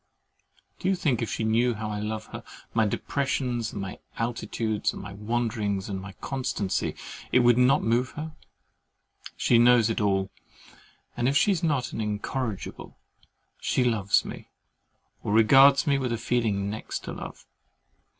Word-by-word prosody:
Do 185 - -2
you 195 - +3
think 135 -9 0
if 115 - -2
she - - -2
knew 115 +2 +2
how 110 0 -4
I 105 - -3
love 110 +1 -4
her, - - -6 0.3
my 110 -1 +3
depressions 125 -1 -1
and - - -6
my 95 -1 -6 0.2
altitudes, 115 -2 -2
my 100 - -8
wanderings 105 -2 -2
and 95 -1 -3
my 100 0 -9
constancy, 125 -4 -2 0.4
it 125 - +5
would 120 0 +5
not 135 +3 +4
move 120 +3 +1
her? 155 +1 -6 1.1
She 120 - +4
knows 120 -2 +5
it 110 - -1
all; 95 -1 +1 0.8
and 120 +1 +1
if 140 - +2
she 200 - +4
is 185 - 0
not 145 -7 0
an - - -3
INCORRIGIBLE, 105 +1 -4 0.6
she 130 - +1
loves 105 -5 +2
me, - - -8 0.7
or 105 - -2
regards 135 +5 +6
me 140 -2 +2
with 130 -3 -2
a 115 - 0
feeling 110 -4 0
next 110 - -5
to - - -6
love. - - -9
115 Hz, 160 wpm, -27 LUFS, 105-125 Hz, 1.1 s, regards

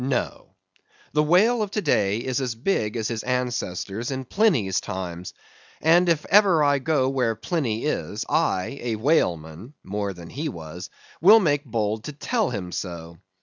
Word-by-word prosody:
No. 130 -1 -3 0.6
The 150 - +3
whale 200 +10 +4
of 210 - -1
to 210 - -1
day 100 0 +2
is 130 +3 -2
as 125 -3 -2
big 115 - -1
as 110 - -1
his 115 -2 -3
ancestors 120 -4 -3
in 130 -1 -4
Pliny's 130 - +2
time. 90 -1 -5 0.5
And 175 +2 +4
if 160 -3 +1
ever 190 -6 +5
I 145 -1 +3
go 135 -1 +1
where 125 -4 0
Pliny 115 -1 -2
is, 85 - -2
I, 95 +9 0
a 120 -2 -2
whaleman 105 - -1
(more 100 +1 -3
than 85 -2 -11
he 150 +4 -3
was), 85 - -8 0.3
will 210 +7 +8
make 145 -6 +1
bold 110 -2 -2
to 150 - -6
tell 220 - -1
him 95 -6 -5
so. 85 -3 -6
125 Hz, 165 wpm, -24 LUFS, 100-155 Hz, 0.6 s, will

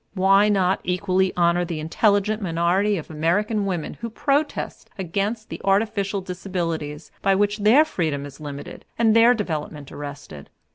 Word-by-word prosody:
Why 195 +2 +4
not 190 -2 +2
equally 185 +1 +1
honor 175 0 +3
the 170 -3 -4
intelligent 205 +6 +1
minority 185 +3 +1
of 160 - -7
American 200 +7 0
women 175 -5 -4
who 230 - -3
protest 285 +6 -2
against 200 +5 -3
the - - -7
artificial 200 0 +1
disabilities 170 -5 -4
by 195 0 +3
which 205 +2 +1
their 230 +9 +5
freedom 155 - -2
is 140 -1 -11
limited 145 -2 -8
and 225 -1 +3
their 235 +2 +6
development 155 - -4
arrested? 145 - -9
190 Hz, 145 wpm, -23 LUFS, 165-210 Hz, -, their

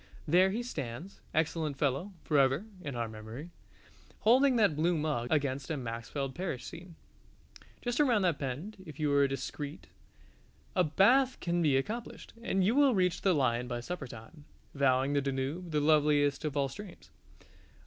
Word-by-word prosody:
There 180 +5 +5
he 225 +5 -2
stands, 165 - -6
excellent 160 -2 -1
fellow, 145 +9 -1
forever 140 +4 +2 0.2
(in 140 -6 -5
our 120 -1 -2
memory) 110 +9 -9 0.7
holding 255 +4 +5
that 205 -9 +3
blue 165 +3 +1
mug 150 -6 -1
against 140 -3 0
a 160 - -1
Maxfield 125 +3 -4
Parrish 170 -7 -4
scene. 170 0 -10 0.9
Just 245 +1 -1
around 245 -9 +4
that 175 -5 +1
bend, 145 +10 -5
if 155 -3 -11
you 150 -2 +1
are 140 -1 +5
discreet, 140 +3 -5 0.9
a 180 - +4
bathe 245 - +4
can 175 0 0
be 145 -5 +3
accomplished, 225 - -5
and 195 -5 +1
you 205 +5 +3
will 275 -3 +4
reach 180 -2 +1
the 190 -3 +3
Lion 125 -3 +1
by 120 -1 -3
supper 140 +2 -5
time, 120 +7 -12 0.3
vowing 135 0 +2
the 140 - +2
Danube 140 +6 -3
the 150 -2 +1
loveliest 145 -1 +3
of 150 -1 -2
all 140 -1 +2
streams. 200 +4 -11
150 Hz, 160 wpm, -31 LUFS, 135-185 Hz, 0.9 s, There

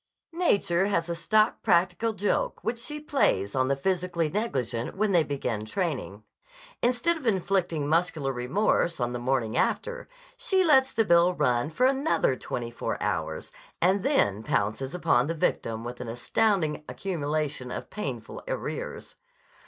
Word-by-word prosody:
Nature 200 - +2
has 170 -5 0
a 170 - -1
stock 215 +6 +2
practical 180 +6 +2
joke 205 -1 -1
which 230 +2 -2
she 300 +5 -5
plays 270 - +1
on 130 0 +1
the 140 - +2
physically 175 +1 0
negligent 130 - -2
when 210 0 +1
they 175 -3 +5
begin 125 -7 -3
training. 125 - -3 0.6
Instead 250 +8 +2
of 280 -6 -6
inflicting 180 -6 0
muscular 160 -4 +1
remorse 165 +6 +1
on 120 0 -1
the 120 - -3
morning 120 -3 0
after, - - -1 0.3
she 380 -1 +2
lets 265 -4 +5
the 225 -1 +1
bill 175 0 +4
run 125 -2 +1
for 165 +11 +1
another 270 - +2
twenty 120 -1 -5
four 120 - -3
hours - - -3 0.3
and 190 +3 +3
then 110 - +2
pounces 110 - -1
upon 160 -8 +2
the 165 - -2
victim 115 -7 -1
with 120 +1 -6
an 125 - -6
astounding 155 - 0
accumulation 150 -7 -2
of - - -6
painful 130 - -5
arrears. - - -5
170 Hz, 150 wpm, -27 LUFS, 130-210 Hz, 0.6 s, they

